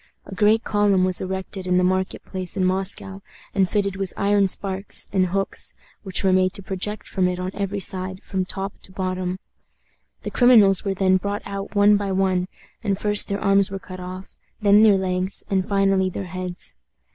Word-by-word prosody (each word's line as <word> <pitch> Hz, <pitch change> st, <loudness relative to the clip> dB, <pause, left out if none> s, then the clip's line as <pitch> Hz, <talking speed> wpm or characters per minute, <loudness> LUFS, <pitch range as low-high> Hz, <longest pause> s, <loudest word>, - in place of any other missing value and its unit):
A -, -, -10 dB
great 210 Hz, +4 st, +3 dB
column 205 Hz, -3 st, +2 dB
was 185 Hz, -1 st, 0 dB
erected 190 Hz, 0 st, -5 dB
in 180 Hz, 0 st, +2 dB
the 180 Hz, -, +3 dB
market 185 Hz, +1 st, -1 dB
place 185 Hz, -2 st, -5 dB
in 185 Hz, -, +1 dB
Moscow, 190 Hz, +1 st, -1 dB, 0.3 s
and 190 Hz, -2 st, +2 dB
fitted 200 Hz, -2 st, -1 dB
with 195 Hz, -2 st, -4 dB
iron 200 Hz, 0 st, +2 dB
spikes 195 Hz, +1 st, +2 dB
and 185 Hz, -2 st, +2 dB
hooks, 195 Hz, +2 st, -3 dB, 0.3 s
which 190 Hz, -2 st, -2 dB
were 190 Hz, -1 st, +3 dB
made 185 Hz, 0 st, +2 dB
to 200 Hz, -, -3 dB
project 195 Hz, +3 st, -4 dB
from 185 Hz, -2 st, 0 dB
it 180 Hz, 0 st, -2 dB
on 180 Hz, +1 st, -4 dB
every 200 Hz, 0 st, -3 dB
side, 185 Hz, 0 st, 0 dB
from 190 Hz, -1 st, -2 dB
top 195 Hz, +1 st, -4 dB
to -, -, -12 dB
bottom. 185 Hz, -1 st, -3 dB, 0.9 s
The -, -, -5 dB
criminals 220 Hz, -6 st, +5 dB
were 195 Hz, -2 st, -2 dB
then 185 Hz, 0 st, +3 dB
brought 200 Hz, +2 st, -4 dB
out 200 Hz, +1 st, -6 dB
one 205 Hz, 0 st, +5 dB
by 200 Hz, -1 st, -3 dB
one, 185 Hz, -1 st, +1 dB, 0.4 s
and 195 Hz, -1 st, 0 dB
first 210 Hz, 0 st, +3 dB
their 200 Hz, 0 st, -2 dB
arms 195 Hz, -1 st, +3 dB
were 195 Hz, -, -5 dB
cut 190 Hz, -2 st, -10 dB
off, 185 Hz, +1 st, -9 dB, 0.2 s
then 205 Hz, -1 st, +5 dB
their 210 Hz, -3 st, +6 dB
legs, 185 Hz, 0 st, -1 dB
and 190 Hz, -1 st, 0 dB
finally 195 Hz, -1 st, +2 dB
their 190 Hz, +1 st, -5 dB
heads. 185 Hz, 0 st, -2 dB
190 Hz, 190 wpm, -22 LUFS, 185-200 Hz, 0.9 s, their